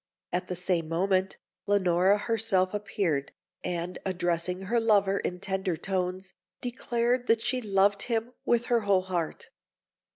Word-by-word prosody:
At 180 - -1
the 180 - -3
same 180 -2 0
moment, 190 +3 +1 0.3
Leonora 190 -1 +4
herself 210 -4 +1
appeared, 195 -9 -1 0.3
and, 175 0 -3
addressing 180 0 -1
her 235 +5 +1
lover 200 -3 +3
in 180 - -3
tender 190 -3 -2
tones, 185 +1 -3 0.3
declared 245 0 -1
that 225 0 +3
she 250 +1 +1
loved 200 -1 +2
him 235 0 -2
with 240 0 +2
her 240 -1 +3
whole 200 -3 +3
heart. 175 -4 -3
195 Hz, 135 wpm, -28 LUFS, 180-225 Hz, 0.3 s, Leonora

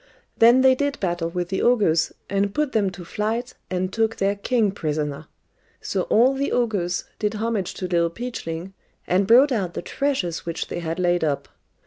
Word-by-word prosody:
Then 235 +3 +6
they 260 0 +6
did 285 +2 -1
battle 175 -3 -1
with 175 0 -3
the 190 - -1
ogres, 200 -10 +3 0.2
and 200 0 -1
put 300 -2 0
them 205 -3 +1
to 180 -1 -10
flight, 225 +6 -2 0.2
and 185 +1 -2
took 225 0 +1
their 195 +1 0
king 215 0 +1
prisoner. 150 -4 -3 0.5
So - - -2
all 245 +5 +5
the 275 +1 -2
ogres 200 -8 0 0.2
did 210 0 -1
homage 215 -3 -2
to 185 - -4
Little 170 -1 +2
Peachling, 185 -5 -6 0.3
and 190 +2 +1
brought 260 +6 +6
out 190 -8 -1
the - - -4
treasures 260 - -2
which 165 -1 -4
they - - -4
had 165 -1 -3
laid 175 -2 +1
up. 145 -3 -1
195 Hz, 180 wpm, -23 LUFS, 175-235 Hz, 0.5 s, Then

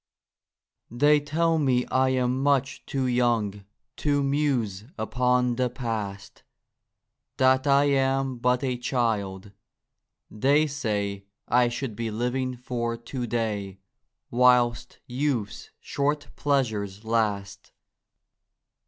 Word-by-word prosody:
THEY 145 +5 +4
tell 160 +3 +1
me 130 -4 +2
I 130 0 +3
am 130 0 0
much 140 -1 +1
too 135 -1 -1
young 120 -5 0 0.3
To 145 -1 +1
muse 135 -8 0
upon 125 +2 +1
the 125 -1 +1
Past 110 -5 -5 0.5
— - - -58
That 130 +1 +3
I 140 0 +5
am 135 -2 +1
but 125 +2 +1
a 130 -2 -1
child, 105 -6 -1 0.8
they 140 +8 +3
say 105 -9 -3 0.2
I 120 +1 +3
should 120 -1 -4
be 115 +1 -3
living 125 +3 -2
for 120 -1 -3
To 120 +1 -5
day, 105 -4 -2 0.5
Whilst 125 -1 +3
youth's 125 -6 -2
short 145 +1 -2
pleasures 110 -8 -1
last. 105 -3 -2
125 Hz, 110 wpm, -26 LUFS, 110-135 Hz, 0.8 s, I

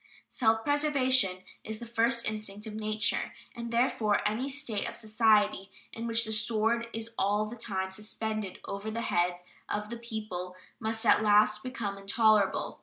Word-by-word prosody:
Self 225 -2 +1
preservation 260 -10 +2 0.2
is 220 0 -5
the 235 - -8
first 235 0 +2
instinct 210 -1 -4
of 215 - -7
nature, 215 -1 0 0.2
and 235 0 -5
therefore 230 -4 +2
any 235 +6 -1
state 265 -7 -2
of - - -9
society 215 -3 +2 0.2
in 230 +1 -5
which 230 0 +1
the 220 - -4
sword 225 +2 +1
is 225 +1 -6
all 205 +2 +2
the 220 +3 -7
time 190 -5 -2
suspended 215 -1 -3
over 200 +2 -5
the 230 +2 -3
heads 175 -3 0 0.3
of 210 +1 -3
the 235 - -4
people 215 -6 -5 0.2
must 225 +1 -2
at 215 - +5
last 210 0 +4
become 220 -6 -4
intolerable. 210 0 +2
220 Hz, 160 wpm, -30 LUFS, 210-235 Hz, 0.3 s, at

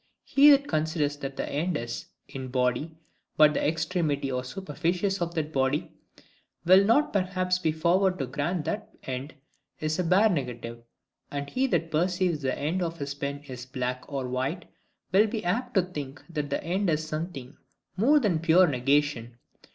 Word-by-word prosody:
He 285 +2 +6
that 280 0 +5
considers 155 -2 0
that 135 -1 -6
the - - -2
end 160 +3 -1
is, 120 -2 -5 0.2
in 130 -1 -7
body, 125 +5 -1 0.4
but 150 -1 +7
the - - -1
extremity 155 -3 0
or 125 0 -2
superficies 180 +6 -2
of 170 0 -2
that 155 -1 -2
body, 135 +2 0 0.7
will 185 +3 +7
not 230 +9 +3
perhaps 185 -2 0
be 165 -3 +1
forward 180 +4 +2
to 135 - -2
grant 150 +6 -2
that 215 +1 -3
the - - -9
end 130 +4 -5 0.4
is 155 +2 -1
a - - +2
bare 185 +6 +4
negative: 120 - -3 0.5
and 140 0 -4
he 265 +1 +1
that 165 -9 0
perceives 175 0 +1
the 130 -2 -1
end 160 +6 -1
of 170 -1 -2
his 140 -2 -4
pen 140 0 -5
is 130 -3 -9
black 125 -1 -3
or 135 -2 -2
white, 130 +8 -2 0.5
will 205 +4 +5
be 215 -2 -4
apt 245 +7 -1
to 190 - +5
think 150 -6 -7
that 150 -4 -4
the 140 - -2
end 185 +3 0
is 155 0 0
something 155 -4 -5 0.4
more 275 +10 +4
than 205 - +1
a - - -4
pure 170 +3 +5
negation. 135 -3 0
155 Hz, 180 wpm, -27 LUFS, 140-185 Hz, 0.7 s, but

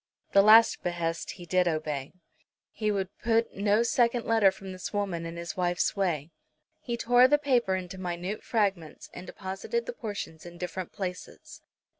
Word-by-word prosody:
The 200 - +7
last 220 +3 +6
behest 170 -1 -3
he 175 - -11
did 180 0 +2
obey. 155 -4 -2 0.6
He 215 -1 -2
would 195 -2 -2
put 230 0 +1
no 205 +3 +2
second 235 0 +1
letter 225 -3 +5
from 190 0 -8
this 185 0 -6
woman 190 -5 -2
in 165 0 -7
his 170 0 -5
wife's 175 +1 0
way. 170 -6 -1 0.5
He 235 -1 -4
tore 245 +2 +5
the 295 +2 +4
paper 250 -9 +1
into 185 0 -6
minute 180 +3 -4
fragments, 195 -8 -2
and 180 - -9
deposited 195 - -4
the - - -5
portions 205 - -6
in 175 0 -11
different 180 0 -5
places. 180 -2 -7
190 Hz, 165 wpm, -28 LUFS, 175-225 Hz, 0.6 s, The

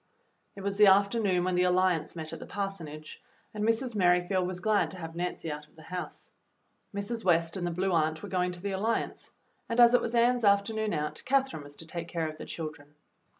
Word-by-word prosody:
It 200 - -8
was 200 0 -2
the 210 -1 +7
afternoon 200 -1 +4
when 185 0 0
the 180 - +2
Alliance 180 -3 +2
met 160 -2 -6
at - - -6
the - - -9
parsonage, 170 -7 -6 0.3
and 210 -1 -3
Mrs. 230 +3 +1
Merrifield 180 -1 +2
was 180 -1 -4
glad 210 +2 +2
to 190 - -8
have 165 -2 -7
Nancy 175 -2 -3
out 150 0 -7
of 150 - -29
the 160 - -14
house. 180 +3 -7 0.6
Mrs. 210 +3 -4
West 165 -2 +2
and 175 -2 -2
the - - 0
Blue 185 +3 -1
Aunt 160 -1 +1
were - - -6
going 180 -1 0
to 175 - -8
the 200 - -2
Alliance, 215 +4 -2 0.4
and 230 +1 -1
as 240 0 +8
it 245 - +5
was 235 +1 -2
Ann's 240 +1 +3
afternoon 210 +1 +2
out, 150 0 -3
Catherine 270 - +1
was 145 0 -12
to 165 - -12
take 170 +1 -6
care 165 -2 -2
of 155 0 -8
the - - -6
children. 150 -2 -7
185 Hz, 220 wpm, -29 LUFS, 165-210 Hz, 0.6 s, as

